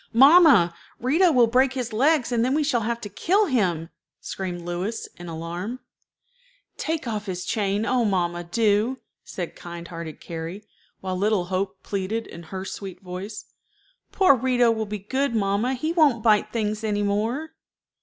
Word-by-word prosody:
"Mamma, 270 Hz, -, +7 dB, 0.3 s
Rito 325 Hz, +9 st, +3 dB
will 250 Hz, -4 st, +5 dB
break 255 Hz, +3 st, +3 dB
his 245 Hz, -4 st, -4 dB
legs, 270 Hz, +2 st, +2 dB
and 235 Hz, -1 st, +2 dB
then 260 Hz, +3 st, +1 dB
we 305 Hz, -, +2 dB
shall 255 Hz, -5 st, +1 dB
have 230 Hz, +2 st, -2 dB
to 205 Hz, -, -5 dB
kill 355 Hz, -, +2 dB
him," 180 Hz, -, 0 dB, 0.3 s
screamed 180 Hz, -2 st, -5 dB
Louis, 175 Hz, +6 st, -4 dB
in 175 Hz, -, -9 dB
alarm. 170 Hz, +9 st, -5 dB, 1.0 s
"Take 320 Hz, -5 st, -3 dB
off 210 Hz, -2 st, -3 dB
his 180 Hz, -1 st, -4 dB
chain, 205 Hz, 0 st, 0 dB
oh, 250 Hz, -1 st, +2 dB
mamma, 175 Hz, -4 st, 0 dB
do," 215 Hz, +6 st, +1 dB, 0.3 s
said 175 Hz, -3 st, -6 dB
kind 170 Hz, 0 st, -8 dB
hearted 165 Hz, -2 st, -7 dB
Carrie; 165 Hz, +5 st, -7 dB, 0.4 s
while 185 Hz, -1 st, -3 dB
little 200 Hz, -1 st, +1 dB
Hope 190 Hz, +1 st, -2 dB
pleaded 205 Hz, +3 st, -3 dB
in 170 Hz, -, -10 dB
her 190 Hz, +2 st, -5 dB
sweet 190 Hz, -2 st, -7 dB
voice: 190 Hz, +3 st, -7 dB, 0.7 s
"Poor 375 Hz, -7 st, +5 dB
Rito 245 Hz, -1 st, +3 dB
will 220 Hz, -1 st, -2 dB
be 210 Hz, +1 st, -4 dB
good, 260 Hz, +6 st, -1 dB
mamma. 210 Hz, +5 st, +1 dB
He 310 Hz, +6 st, -2 dB
won't 290 Hz, -10 st, +3 dB
bite 215 Hz, -2 st, +3 dB
things 215 Hz, -1 st, -2 dB
any 205 Hz, -1 st, 0 dB
more." 225 Hz, +10 st, -1 dB
215 Hz, 165 wpm, -24 LUFS, 185-250 Hz, 1.0 s, Mamma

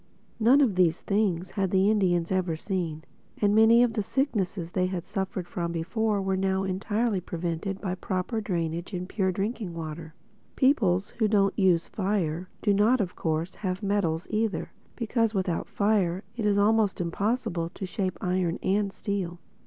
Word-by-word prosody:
None 250 Hz, +6 st, +6 dB
of 250 Hz, -8 st, +3 dB
these 180 Hz, -2 st, +3 dB
things 190 Hz, -4 st, 0 dB
had 195 Hz, -1 st, 0 dB
the 190 Hz, +2 st, +3 dB
Indians 180 Hz, -5 st, +1 dB
ever 185 Hz, -3 st, 0 dB
seen; 165 Hz, -3 st, -3 dB, 0.4 s
and 205 Hz, -1 st, +3 dB
many 225 Hz, +2 st, +6 dB
of 240 Hz, -2 st, +1 dB
the 215 Hz, -, 0 dB
sicknesses 200 Hz, -, -1 dB
which -, -, -30 dB
they 185 Hz, 0 st, +1 dB
had 185 Hz, -2 st, -4 dB
suffered 190 Hz, -3 st, -3 dB
from 170 Hz, -1 st, -3 dB
before 200 Hz, +5 st, -1 dB
were 190 Hz, 0 st, 0 dB
now 190 Hz, 0 st, 0 dB
entirely 205 Hz, +2 st, 0 dB
prevented 175 Hz, +3 st, -3 dB
by 185 Hz, -3 st, -2 dB
proper 185 Hz, +4 st, -2 dB
drainage 170 Hz, -1 st, -3 dB
and 180 Hz, 0 st, -4 dB
pure 190 Hz, -2 st, 0 dB
drinking 195 Hz, -1 st, -3 dB
water. 160 Hz, 0 st, -7 dB, 0.4 s
Peoples 205 Hz, -9 st, +2 dB
who 220 Hz, -, +4 dB
don't 200 Hz, -2 st, +3 dB
use 180 Hz, -4 st, +3 dB
fire 185 Hz, -4 st, -1 dB
do 205 Hz, -, +3 dB
not 215 Hz, +6 st, +4 dB
of 190 Hz, -4 st, -2 dB
course 160 Hz, +2 st, -1 dB
have 185 Hz, 0 st, -4 dB
metals 190 Hz, -5 st, 0 dB
either; 215 Hz, -3 st, -1 dB, 0.2 s
because 230 Hz, -2 st, 0 dB
without 185 Hz, -3 st, -1 dB
fire 200 Hz, -3 st, +1 dB
it 220 Hz, -3 st, -1 dB
is 205 Hz, -1 st, +3 dB
almost 210 Hz, 0 st, +3 dB
impossible 175 Hz, -1 st, -1 dB
to 190 Hz, -, -6 dB
shape 185 Hz, -1 st, -2 dB
iron 180 Hz, -2 st, 0 dB
and 200 Hz, +1 st, +1 dB
steel. 190 Hz, -4 st, -3 dB
190 Hz, 170 wpm, -27 LUFS, 175-210 Hz, 0.4 s, None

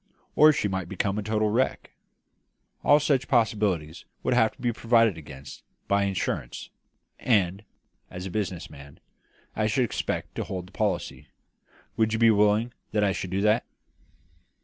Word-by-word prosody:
Or 155 Hz, +1 st, +7 dB
she 125 Hz, -, -1 dB
might 95 Hz, -2 st, -3 dB
become 100 Hz, +1 st, -1 dB
a -, -, -2 dB
total 110 Hz, 0 st, 0 dB
wreck. 125 Hz, +4 st, -1 dB, 0.9 s
All 145 Hz, +2 st, +6 dB
such 140 Hz, -3 st, +1 dB
possibilities 105 Hz, -, 0 dB, 0.2 s
would 130 Hz, -, +1 dB
have 110 Hz, -3 st, +3 dB
to -, -, -30 dB
be 120 Hz, -1 st, -1 dB
provided 115 Hz, -3 st, +3 dB
against 70 Hz, -3 st, -11 dB, 0.3 s
by 100 Hz, 0 st, +2 dB
insurance, 95 Hz, -10 st, -3 dB, 0.5 s
and, 100 Hz, -4 st, +1 dB, 0.5 s
as 90 Hz, +1 st, -7 dB
a 95 Hz, -, -5 dB
business 95 Hz, -4 st, -3 dB
man, 70 Hz, -1 st, -14 dB, 0.6 s
I 110 Hz, 0 st, +1 dB
should 125 Hz, +3 st, +1 dB
expect -, -, -3 dB
to -, -, -3 dB
hold 90 Hz, -2 st, -5 dB
the -, -, -20 dB
policy. 95 Hz, -10 st, -2 dB, 0.7 s
Would 110 Hz, -1 st, +2 dB
you -, -, +1 dB
be 115 Hz, 0 st, +5 dB
willing 105 Hz, +3 st, +2 dB, 0.2 s
that 105 Hz, -1 st, +2 dB
I 100 Hz, -, +3 dB
should 95 Hz, 0 st, -4 dB
do 95 Hz, +2 st, -1 dB
that?" 105 Hz, +3 st, +3 dB
105 Hz, 160 wpm, -26 LUFS, 95-115 Hz, 0.9 s, Or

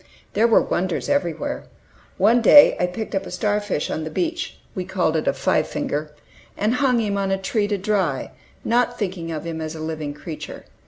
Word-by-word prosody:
There 220 Hz, +3 st, +4 dB
were 230 Hz, -, +5 dB
wonders 180 Hz, -1 st, -1 dB
everywhere. 285 Hz, -, -1 dB, 0.5 s
One 225 Hz, +5 st, +4 dB
day 290 Hz, +5 st, +8 dB
I 180 Hz, -, +2 dB
picked 215 Hz, +5 st, -5 dB
up 195 Hz, -1 st, -1 dB
a -, -, -7 dB
star 205 Hz, +3 st, 0 dB
fish 205 Hz, -7 st, -2 dB
on 160 Hz, -, -2 dB
the 155 Hz, -, -4 dB
beach 335 Hz, -, -2 dB, 0.2 s
(we 185 Hz, -, -3 dB
called 180 Hz, -3 st, 0 dB
it 155 Hz, -, -1 dB
a -, -, +3 dB
"five -, -, +1 dB
finger"), 150 Hz, +1 st, -3 dB, 0.5 s
and 215 Hz, +3 st, +1 dB
hung 250 Hz, -2 st, +2 dB
him 205 Hz, -3 st, 0 dB
on 195 Hz, -1 st, 0 dB
a 195 Hz, -, +1 dB
tree 205 Hz, +2 st, 0 dB
to 205 Hz, -1 st, 0 dB
dry, 190 Hz, -8 st, -1 dB, 0.3 s
not 245 Hz, +1 st, +2 dB
thinking 180 Hz, -5 st, -3 dB
of 155 Hz, -2 st, -4 dB
him 165 Hz, -1 st, -4 dB
as 155 Hz, 0 st, -4 dB
a -, -, -7 dB
living 155 Hz, -2 st, -4 dB
creature. 155 Hz, 0 st, -8 dB
195 Hz, 205 wpm, -22 LUFS, 160-220 Hz, 0.5 s, day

